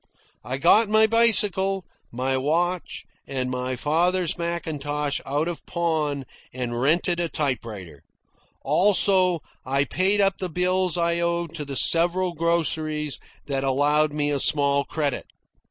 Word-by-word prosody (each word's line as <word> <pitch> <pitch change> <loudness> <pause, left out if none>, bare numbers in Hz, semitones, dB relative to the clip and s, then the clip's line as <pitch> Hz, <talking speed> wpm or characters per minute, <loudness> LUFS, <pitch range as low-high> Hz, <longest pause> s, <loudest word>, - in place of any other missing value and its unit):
I 130 +2 -4
got 205 +9 +4
my 220 +1 +4
bicycle, 200 -4 +3 0.3
my 130 +2 -2
watch, 170 +6 -2 0.2
and 130 -2 -3
my 125 0 -3
father's 170 +6 0
mackintosh 150 -4 -3
out 145 +4 -1
of 170 -4 -5
pawn 155 -5 -2 0.3
and 120 -1 -4
rented 170 +5 +1
a 170 -1 -1
typewriter. 110 - -4 0.6
Also, 185 +2 +5 0.2
I 140 +1 0
paid 190 +7 0
up 195 -1 +1
the 185 - -3
bills 180 +1 +1
I 170 0 0
owed 170 -1 -2
to 155 -3 -5
the 140 -1 -6
several 175 +4 +2
groceries 155 -3 -1 0.3
that 135 -2 -2
allowed 145 +3 +2
me 145 0 -2
a 140 - -1
small 140 -1 +2
credit. 145 -4 -3
160 Hz, 135 wpm, -23 LUFS, 140-180 Hz, 0.6 s, Also